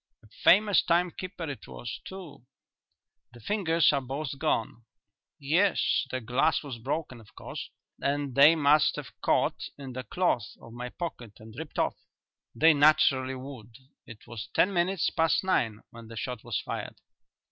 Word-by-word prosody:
"A - - -18 0.2
famous 205 +1 +6
time 175 +1 +2
keeper 180 -2 -7
it 140 -7 -7
was, 120 -2 -7
too." 185 -9 -10 0.9
"The 120 - -13
fingers 165 - +2
are 140 - +1
both 135 +1 -5
gone." 115 -6 -1 0.5
"Yes; 165 +1 +2
the 130 - -2
glass 125 +8 +1
was 130 -5 -7
broken, 130 0 -4
of 105 - -20
course, - - -7 0.3
and 140 -1 -1
they 145 +5 +7
must 150 -1 +4
have - - -7
caught - - +1
in 135 -3 -8
the 130 +1 -5
cloth 125 - -1
of 115 - -13
my 125 +1 -6
pocket 125 - -6
and 110 0 -13
ripped 155 +2 -8
off." - - 0 0.6
"They 160 +1 +6
naturally 140 -3 +4
would; 130 -4 -10 0.3
it 115 -2 -12
was 115 -1 -7
ten 200 - +3
minutes 175 0 +1
past 165 0 +2
nine 115 - 0
when 115 -1 -12
the 115 0 -10
shot 125 +1 -5
was 120 -4 -2
fired." - - -5
140 Hz, 160 wpm, -28 LUFS, 120-165 Hz, 0.9 s, they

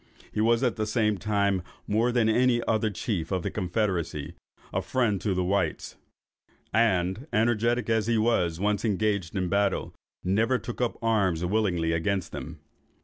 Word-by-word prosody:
He 105 - -1
was, 115 +3 +3
at 125 -2 +1
the 110 -1 -1
same 105 -2 +1
time, 100 -2 +1 0.2
more 115 +4 +1
than 120 -2 +2
all 120 +3 +3
the 120 -2 +2
other 110 -1 +2
chiefs 95 -5 -3
of 95 -3 -1
the - - -2
confederacy, 90 -6 -2 0.4
a - - 0
friend 115 -7 0
to 100 -3 0
the 90 - +1
whites; 95 -3 -1 0.8
and, 110 - +1
energetic 115 +1 +1
as 110 -1 +1
he 115 -1 +2
was 90 -7 +1
when - - -4
once 105 0 +1
engaged 105 -4 0
in 95 -2 0
battle, 100 +2 0 0.3
never 110 +7 +2
took 120 0 -6
up 120 - 0
arms 95 -7 +1
willingly 90 -5 +1
against 90 +4 -1
them. 80 +1 -7
105 Hz, 170 wpm, -27 LUFS, 90-115 Hz, 0.8 s, was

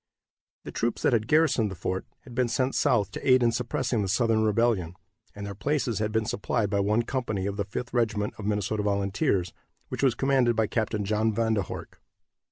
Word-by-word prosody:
The - - -7
troops 120 0 -2
that - - +3
had 110 -2 +1
garrisoned 150 -8 +3
the 95 - -6
fort 95 +2 -3
had 125 - -13
been 125 +1 +1
sent 130 +3 0
south 105 -6 +2
to - - -3
aid 130 -1 +6
in 120 - +4
suppressing 120 0 -1
the 100 - -1
Southern 110 +2 +2
rebellion, 105 -6 +1 0.4
and 100 0 -6
their 100 - -5
places 120 0 -1
had 105 0 -1
been 110 0 0
supplied 105 -1 -1
by 100 - +1
one 105 +4 +2
company 115 -7 -2
of 100 0 -2
the 100 -1 -2
Fifth 120 +5 -5
Regiment 110 -4 0
of 105 - -6
Minnesota 105 0 0
Volunteers, 100 -3 0 0.4
which - - -4
was 130 -4 +3
commanded 130 -2 +2
by 110 0 +2
Capt. 110 -1 -1
John 110 +2 +1
Van 115 0 +1
der 105 - +1
Horck. 95 - -8
110 Hz, 205 wpm, -27 LUFS, 100-120 Hz, 0.4 s, aid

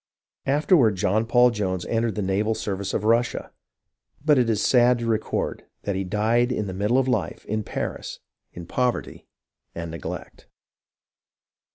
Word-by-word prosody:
Afterward 140 - +4
John 105 +5 +1
Paul 125 +1 +5
Jones 95 -5 -2
entered 115 -2 0
the 105 - -2
naval 105 +4 0
service 100 -2 -3
of - - -1
Russia, 115 +2 +1 0.7
but 150 -3 +5
it 120 -2 +2
is 110 - +1
sad 125 -1 +5
to 120 - -4
record 110 -1 -2 0.2
that 100 - -2
he 95 - -1
died 110 +6 +1
in 100 -6 -2
middle 110 +7 +2
life 125 -6 -2
in 110 +1 -2
Paris - - -5 0.3
in 85 - -9
poverty 125 +7 -2 0.5
and 85 -1 -5
neglect. 80 -3 -7
110 Hz, 145 wpm, -24 LUFS, 100-120 Hz, 0.7 s, Paul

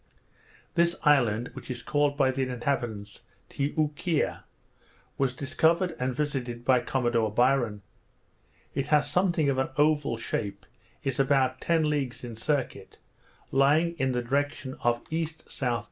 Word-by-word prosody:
This 170 0 +3
island, 120 -6 +3
which - - -10
is 125 -2 -5
called 145 +2 +1
by 135 -2 +3
the 130 +1 -2
inhabitants 120 -5 -3 0.3
Ti 140 +1 -2
oo 150 -1 +1
kea, 160 0 0 0.8
was 135 -2 +2
discovered 165 +6 +1
and 125 0 -1
visited 125 -5 -3
by 130 -1 +5
Commodore 120 -2 0
Byron. 120 -3 +2 0.9
It 135 - -2
has 150 -1 +3
something 175 -4 +2
of 135 -1 +1
an 130 - 0
oval 150 -5 +2
shape, 100 -3 -4 0.4
is 135 -1 -2
about 135 -2 +2
ten 165 -2 +2
leagues 135 -6 -2
in 120 -2 -6
circuit, 135 +3 -2 0.5
lying 150 +5 +3
in 130 0 +1
the 125 -1 -1
direction 140 +1 -1
of 120 0 +1
E.S.E. 160 -1 -2
135 Hz, 140 wpm, -28 LUFS, 120-150 Hz, 0.9 s, by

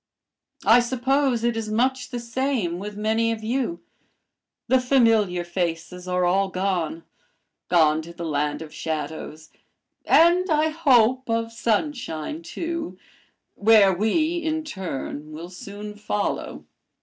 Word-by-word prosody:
I 235 - +7
suppose 260 0 +1
it 235 -1 +1
is 225 -1 -3
much 250 +3 0
the 245 - -4
same 235 -7 -2
with 205 +1 -7
many 220 +2 +1
of 220 -1 -5
you 260 +8 -2 0.8
the 260 0 +4
familiar 225 -8 +3
faces 175 0 -3
are 180 0 +1
all 195 +2 +2
gone, 180 -4 -2 0.7
gone 160 -3 +4
to 165 +2 -10
the 170 0 -7
land 150 0 -1
of 155 - -12
shadows, 155 0 -5 0.5
and 350 +3 +5
I 310 0 +3
hope 260 -6 +3
of 230 0 0
sunshine 235 - -2
too, 335 - -5 0.6
where 205 -2 +5
we 310 - +1
in 315 -1 -2
turn 155 - -6
will 165 +3 -8
soon 205 +3 -8
follow. 210 0 -3
220 Hz, 125 wpm, -24 LUFS, 175-260 Hz, 0.8 s, I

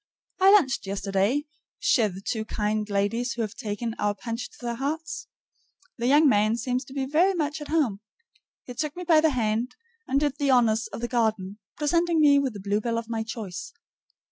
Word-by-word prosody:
I 380 +1 +7
lunched 285 - +3
yesterday 195 +8 0 0.3
CHEZ 215 -7 +2
the 190 - -8
two 220 -2 -1
kind 215 -1 -2
ladies 220 +5 0
who 235 - -2
have 215 - -4
taken 220 +2 -4
our 205 0 0
Punch 230 +3 -5
to - - -19
their 240 -1 -3
hearts. 305 +6 -4 0.7
The 235 - 0
young 295 +3 +6
man 215 -2 +3
seems 250 +2 -1
to 265 - -12
be 270 -1 -2
very 340 +8 +3
much 305 -2 -2
at 295 - -6
home. 285 -11 +1 0.6
He 250 - -8
took 300 +3 -3
me 360 - -6
by 325 -3 +5
the 320 - +4
hand, 230 -2 -1 0.3
and 270 +1 +2
did 290 -1 -1
the 285 -1 +1
honors 230 -3 +3
of - - -8
the 240 - -1
garden, 220 -5 -1 0.2
presenting 335 +2 +2
me 285 -2 +6
with 270 -4 -1
the 205 - -8
bluebell 210 +4 -1
of 230 0 -5
my 225 -1 -2
choice. 220 -5 -6
240 Hz, 195 wpm, -26 LUFS, 215-290 Hz, 0.7 s, I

